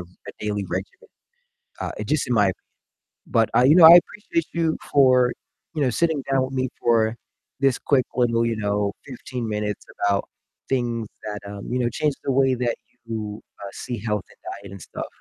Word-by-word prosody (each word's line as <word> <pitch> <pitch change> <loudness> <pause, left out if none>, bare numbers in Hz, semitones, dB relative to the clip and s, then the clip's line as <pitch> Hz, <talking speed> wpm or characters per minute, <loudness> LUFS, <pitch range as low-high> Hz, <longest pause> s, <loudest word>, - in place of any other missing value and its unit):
r - - -7 0.2
a - - -6
daily 105 -1 -1
regimen, 95 +2 -5 0.7
uh, - - -3
just 150 -2 0
in - - 0
my 105 -3 +4
opinion, 95 - -2 0.7
but, 115 -1 +2
uh, - - +6
you 145 +4 +7
know, 175 - +8
I 170 +2 +12
appreciate 170 -6 -3
you 165 -1 +1 0.2
for, 130 -3 +5 0.4
you 150 - 0
know, 130 - +2
sitting 160 +2 +1
down 135 -1 +3
with 135 - -8
me 130 0 0
for 115 -1 +2 0.4
this 135 -2 +3
quick 130 -3 +2
little, 115 -2 +2
you 115 -1 -1
know, 100 -1 0
15 125 -2 -6
minutes 105 -1 -3 0.2
about 100 -1 +1 0.4
things 120 -4 -1 0.2
that, 105 -1 -4
um, 100 -1 -8
you 125 - +1
know, 120 - +2
changed 145 +4 -1
the 135 - +1
way 135 0 +3
that 120 -1 -1 0.3
you, 110 -2 -5 0.2
uh, 100 - -6
see 120 -2 -5
health 105 -3 -2
and - - -21 0.2
diet 100 -1 -10
and 100 - -9
stuff. - - -6
120 Hz, 195 wpm, -23 LUFS, 105-135 Hz, 0.7 s, I